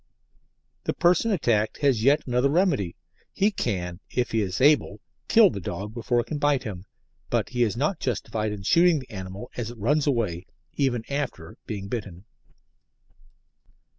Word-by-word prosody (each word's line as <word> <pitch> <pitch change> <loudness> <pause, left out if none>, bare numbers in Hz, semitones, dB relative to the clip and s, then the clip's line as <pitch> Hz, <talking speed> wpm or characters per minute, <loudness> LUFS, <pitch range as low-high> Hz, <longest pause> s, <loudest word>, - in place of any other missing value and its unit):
The - - -1
person 180 +6 +3
attacked 115 - +1
has 135 -6 +3
yet 140 +4 +4
another 125 +2 +2
remedy. 145 - +1 0.4
He 205 +2 +2
can, 90 - -3
if 125 -2 -1
he 115 - +1
is 95 -2 -2
able, 135 -7 +3 0.3
kill 220 -5 +6
the - - -5
dog 100 +4 -5
before 120 +1 0
it - - -8
can 150 +3 -4
bite 145 -3 +2
him, 95 -6 -7 0.4
but - - 0
he 125 -1 -2
is 115 -3 +1
not 155 +6 0
justified 110 -3 -2
in 100 -2 -6
shooting 170 - +4
the 130 - -8
animal 95 +3 -7
as 120 -2 -3
it 120 - -10
runs 145 +8 +1
away, 105 -10 -1 0.3
even 130 -5 0
after 140 - -4
being 100 -3 -5
bitten. 100 -4 -6
120 Hz, 165 wpm, -25 LUFS, 100-145 Hz, 0.4 s, kill